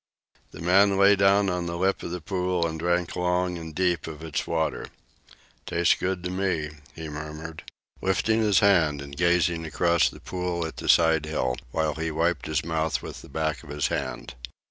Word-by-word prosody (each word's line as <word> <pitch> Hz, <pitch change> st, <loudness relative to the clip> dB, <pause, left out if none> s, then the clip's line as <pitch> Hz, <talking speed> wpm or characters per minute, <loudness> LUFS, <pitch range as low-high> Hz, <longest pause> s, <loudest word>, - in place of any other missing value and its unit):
The -, -, -11 dB
man 95 Hz, +3 st, +4 dB
lay 100 Hz, +1 st, +6 dB
down 100 Hz, +1 st, +4 dB
on 90 Hz, -2 st, -1 dB
the 85 Hz, 0 st, -3 dB
lip 95 Hz, +2 st, +1 dB
of -, -, -5 dB
the 90 Hz, 0 st, -5 dB
pool 90 Hz, -1 st, -1 dB
and 80 Hz, -1 st, -3 dB
drank 85 Hz, +1 st, 0 dB
long 90 Hz, 0 st, 0 dB
and 80 Hz, -2 st, -9 dB
deep 90 Hz, -3 st, 0 dB
of 80 Hz, -1 st, -8 dB
its 80 Hz, -3 st, -3 dB
water. 80 Hz, -1 st, -1 dB, 0.8 s
"Tastes 85 Hz, 0 st, +3 dB
good 90 Hz, -1 st, -2 dB
to 90 Hz, -, -3 dB
me," 90 Hz, -5 st, -1 dB, 0.2 s
he 80 Hz, -1 st, -6 dB
murmured, 75 Hz, +1 st, -7 dB, 0.4 s
lifting 105 Hz, +4 st, +1 dB
his 105 Hz, -4 st, +4 dB
head 85 Hz, -8 st, +4 dB
and 70 Hz, 0 st, -8 dB
gazing 85 Hz, 0 st, +2 dB
across 85 Hz, +2 st, +2 dB
the -, -, -13 dB
pool 90 Hz, -2 st, -3 dB
at 80 Hz, -, -7 dB
the -, -, -4 dB
side 80 Hz, -2 st, +4 dB
hill, 65 Hz, -5 st, -1 dB
while 80 Hz, +3 st, 0 dB
he 80 Hz, +1 st, -3 dB
wiped 80 Hz, -1 st, 0 dB
his 80 Hz, 0 st, -1 dB
mouth 80 Hz, -1 st, -1 dB
with -, -, -8 dB
the -, -, -14 dB
back 80 Hz, 0 st, -2 dB
of 80 Hz, -, -15 dB
his 75 Hz, 0 st, -1 dB
hand. -, -, -4 dB
85 Hz, 190 wpm, -26 LUFS, 80-90 Hz, 0.8 s, lay